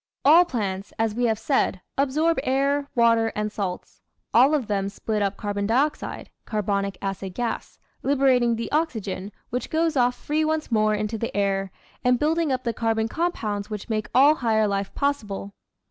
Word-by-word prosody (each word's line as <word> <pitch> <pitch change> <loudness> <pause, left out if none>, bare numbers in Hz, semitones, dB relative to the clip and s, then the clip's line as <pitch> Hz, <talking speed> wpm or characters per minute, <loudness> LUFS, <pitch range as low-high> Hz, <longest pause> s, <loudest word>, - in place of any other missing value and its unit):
All 330 +5 +8
plants, 200 - -3
as 225 -1 0
we 240 +2 0
have 220 -2 +1
said, 225 -4 0 0.2
absorb 300 +4 +1
air, 280 +1 +1
water, 230 -1 +4
and 210 0 -2
salts; 190 -4 -5 0.3
all 265 +6 +6
of 275 -6 -1
them 200 -2 -1
split 210 +1 -3
up 200 0 -1
carbon 205 -1 -2
dioxide 285 +7 -1
(carbonic 200 -3 -1
acid 195 -1 -4
gas), 240 -2 -3 0.2
liberating 260 -4 +3
the 230 0 -5
oxygen, 215 - -2 0.2
which 250 +2 -3
goes 325 0 +1
off 245 -1 +3
free 300 +4 -1
once 310 -3 -1
more 215 -1 +3
into 210 +1 -3
the 230 - -3
air, 195 -1 0 0.3
and 250 0 +4
building 315 +2 +1
up 255 -1 -1
the 235 - -1
carbon 225 -1 0
compounds 215 -10 -2
which 210 0 -6
make 215 -1 -2
all 280 +4 +7
higher 220 -6 +1
life 200 -1 -2
possible. 210 -8 -2
230 Hz, 170 wpm, -24 LUFS, 205-275 Hz, 0.3 s, All